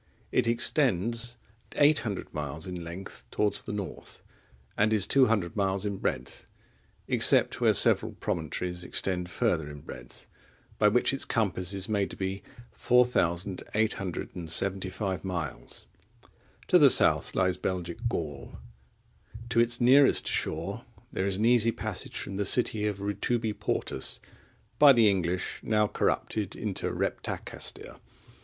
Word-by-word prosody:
It 125 -2 +2
extends 120 - +1 0.4
800 145 -9 +2
miles 75 +1 -4
in 90 -2 -6
length 85 +4 -8
towards 105 -1 +1
the - - -6
north, 100 -3 -7 0.5
and 110 +1 +2
is 100 -3 +1
200 115 -10 +2
miles 100 -1 0
in 100 -1 -2
breadth, - - -4 0.6
except - - +4
where - - +5
several - - +3
promontories 90 +3 -4
extend 90 0 -2
further 80 -3 0
in 75 -1 -10
breadth, - - -12 0.5
by 105 - +5
which 120 +5 +3
its 135 - 0
compass 95 -6 -1
is 95 -1 -2
made 100 -3 0
to - - -8
be 95 +1 -3 0.3
4,875 95 -3 -1
miles.(22) 85 -7 -5 0.8
To - - +6
the - - +8
south - - +3
lies 95 -1 +1
Belgic 90 -1 -4
Gaul. 75 -9 -5 0.9
To 115 0 +2
its 120 +1 +3
nearest 130 +3 +5
shore - - -2 0.3
there 95 - -1
is 95 -1 -1
an 110 - 0
easy 115 -1 +5
passage - - -5
from 95 - -4
the 100 - -1
city 110 -3 +1
of 100 -2 -4
Rutubi 110 +2 -1
Portus, 65 - -3 0.6
by 145 -2 +9
the 115 -3 +5
English 90 -2 -1
now 105 -1 +2
corrupted 105 -1 -1
into 105 -4 -3
Reptacaestir. - - -4
100 Hz, 130 wpm, -28 LUFS, 90-115 Hz, 0.9 s, by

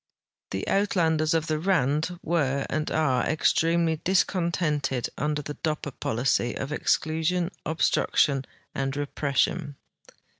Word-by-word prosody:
The 95 - -3
Uitlanders 165 -5 +2
of 160 -1 +1
the 155 -1 -1
Rand 165 -1 +1
were, 140 -5 0
and 155 +2 -1
are, 135 -6 +1
extremely 165 +1 +2
discon 180 0 +1
tented 145 -7 -1
under 150 +1 -1
the 150 - -5
Doj)per 150 -2 -4
policy 120 +1 0
of 135 - -4
exclusion, 160 +4 0 0.2
obstruction, 140 -2 +2 0.3
and 135 0 -2
repression. 145 +1 -1
155 Hz, 115 wpm, -26 LUFS, 140-165 Hz, 0.3 s, Uitlanders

